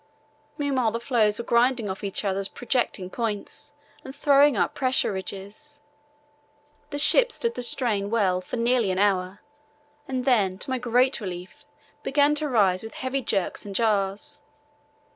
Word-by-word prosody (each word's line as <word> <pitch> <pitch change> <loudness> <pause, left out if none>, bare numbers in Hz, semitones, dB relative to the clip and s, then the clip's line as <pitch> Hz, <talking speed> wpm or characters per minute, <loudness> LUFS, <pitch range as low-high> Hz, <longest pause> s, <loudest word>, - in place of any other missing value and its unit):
Meanwhile 265 -6 0
the 230 - -2
floes 225 -4 +1
were 235 - -5
grinding 240 -1 +2
off 190 +1 -5
each 200 +1 -2
other's 195 0 -1
projecting 235 -7 -2
points 230 +6 -4 0.3
and 265 - -9
throwing 285 -3 +4
up - - +1
pressure 260 -5 +1
ridges. 200 +10 -8 1.1
The 290 - -4
ship 480 +11 +4
stood 465 +1 -2
the - - -5
strain 225 -5 +1
well 195 -5 +1
for 185 - -6
nearly 235 -2 +1
an 185 - -1
hour 190 -1 0 0.7
and 255 -1 -3
then, 205 -8 +2
to 260 - -6
my 260 - 0
great 250 +2 +2
relief, 185 +9 -8 0.4
began 285 +1 +3
to 300 0 -1
rise 195 -7 +3
with 225 - -9
heavy 260 +1 -2
jerks 195 -6 -1
and 200 -1 -8
jars. 200 -2 0
230 Hz, 155 wpm, -25 LUFS, 195-265 Hz, 1.1 s, throwing